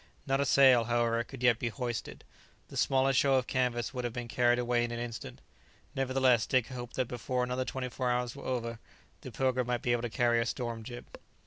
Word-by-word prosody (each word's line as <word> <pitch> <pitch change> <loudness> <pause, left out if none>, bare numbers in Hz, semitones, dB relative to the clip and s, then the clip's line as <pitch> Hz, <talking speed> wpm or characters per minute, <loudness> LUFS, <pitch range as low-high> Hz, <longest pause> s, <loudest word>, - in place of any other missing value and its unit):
Not 135 0 +1
a - - +1
sail, 130 -4 +6
however, 115 0 +1
could 130 0 -10
yet 120 -2 +4
be 120 - -1
hoisted; 120 +1 -5 0.5
the - - -11
smallest 135 -1 +3
show 135 -1 +3
of 130 -2 +2
canvas 125 -1 -1
would 125 -1 -3
have 120 -2 -3
been 120 -1 -5
carried 120 +1 +2
away 120 -1 +1
in 120 - -2
an 120 - -4
instant; 120 - -6 0.5
nevertheless 130 -3 +2
Dick 130 -2 +1
hoped 125 -2 -7
that 130 -2 0
before 125 +1 -2
another 125 +1 -2
twenty 130 -1 -4
four 125 0 -2
hours 125 0 -1
were 140 - -10
over, 115 -3 -3 0.4
the - - -8
"Pilgrim" 130 -2 0
might 125 -1 -1
be 120 - +1
able 120 -1 +1
to 120 - -3
carry 120 +1 +2
a - - 0
storm 120 -3 -3
jib. 120 +2 -8
125 Hz, 220 wpm, -31 LUFS, 120-130 Hz, 0.5 s, sail